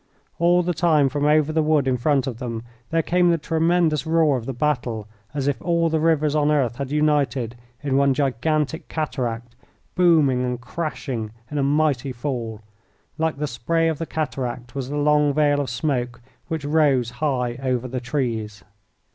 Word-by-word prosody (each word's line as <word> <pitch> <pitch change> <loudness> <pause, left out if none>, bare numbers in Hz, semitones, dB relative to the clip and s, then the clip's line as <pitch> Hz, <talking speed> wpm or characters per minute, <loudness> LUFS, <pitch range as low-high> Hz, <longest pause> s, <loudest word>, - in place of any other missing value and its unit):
All 175 +1 +4
the 175 +1 0
time 155 -4 +3
from 145 +1 -1
over 155 0 +3
the 160 - +2
wood 150 -3 +2
in 130 - +2
front 135 +1 +1
of 125 -4 -5
them 115 -3 -4 0.3
there 165 0 +1
came 175 +1 +3
the 170 - +3
tremendous 165 0 +1
roar 160 -3 +3
of 120 -3 -4
the - - -1
battle, 120 -6 -1 0.2
as 140 -2 -2
if 140 -4 -1
all 170 -1 +1
the 160 0 +1
rivers 155 -2 +2
on 150 -1 +2
earth 130 -5 +1
had 140 -1 -4
united 145 -5 +1 0.3
in 135 -2 +1
one 140 -1 +3
gigantic 150 +4 0
cataract, 120 -6 -3 0.4
booming 155 -8 +4
and 125 -1 -2
crashing 130 -5 -4 0.2
in 150 - -1
a - - +1
mighty 140 -2 +1
fall. 120 -4 -4 0.6
Like 160 -2 0
the 150 - -1
spray 165 +6 0
of 160 - -3
the 165 - -3
cataract 125 -5 -4
was 135 -2 -4
the 145 - -3
long 150 -1 +3
veil 145 -1 +3
of 135 - -3
smoke 125 0 -2 0.3
which 160 -4 -3
rose 145 -6 +2
high 125 -5 0
over 130 -2 -1
the 125 0 -4
trees. 115 -7 -3
145 Hz, 180 wpm, -23 LUFS, 125-155 Hz, 0.6 s, All